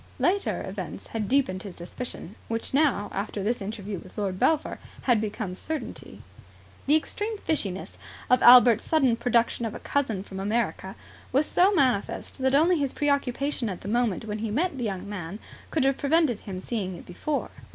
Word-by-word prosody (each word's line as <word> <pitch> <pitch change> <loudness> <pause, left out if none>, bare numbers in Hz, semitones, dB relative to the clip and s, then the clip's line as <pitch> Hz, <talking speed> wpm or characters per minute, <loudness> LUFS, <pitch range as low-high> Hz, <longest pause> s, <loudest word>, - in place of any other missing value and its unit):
Later 395 +2 +1
events - - -6
had 220 -3 -3
deepened 250 -9 +2
his 195 -3 -8
suspicion, 180 +1 -7
which 225 +2 -3
now, 275 -8 +2
after 200 0 -3
this 230 +3 0
interview 200 -1 -5
with 180 - -15
Lord 195 -3 -2
Belpher, 315 -2 +1 0.2
had 240 -5 +3
become 210 -3 -3
certainty. 315 +11 -6 0.6
The 295 - +5
extreme 415 +7 -1
fishiness 200 - -3 0.3
of 250 0 +4
Albert's 240 -2 +8
sudden 270 -7 +3
production 235 0 +1
of 225 -2 -3
a - - -6
cousin 230 -9 -1
from 190 -1 -8
America 200 -2 -1 0.4
was 275 +4 +3
so 370 +6 +4
manifest 255 - 0
that 265 +1 +2
only 330 +3 +4
his 280 -2 -1
preoccupation 280 -3 0
at 185 - -6
the - - -8
moment 230 -2 0
when 210 0 -4
he 220 0 -2
met 300 - 0
the - - -2
young 195 -2 -4
man 190 -2 -5 0.3
could 310 - +1
have 270 0 +2
prevented 290 -6 +2
him 190 -3 -6
seeing 190 -3 -3
it - - -11
before. 280 +11 -3
235 Hz, 175 wpm, -26 LUFS, 200-280 Hz, 0.6 s, Albert's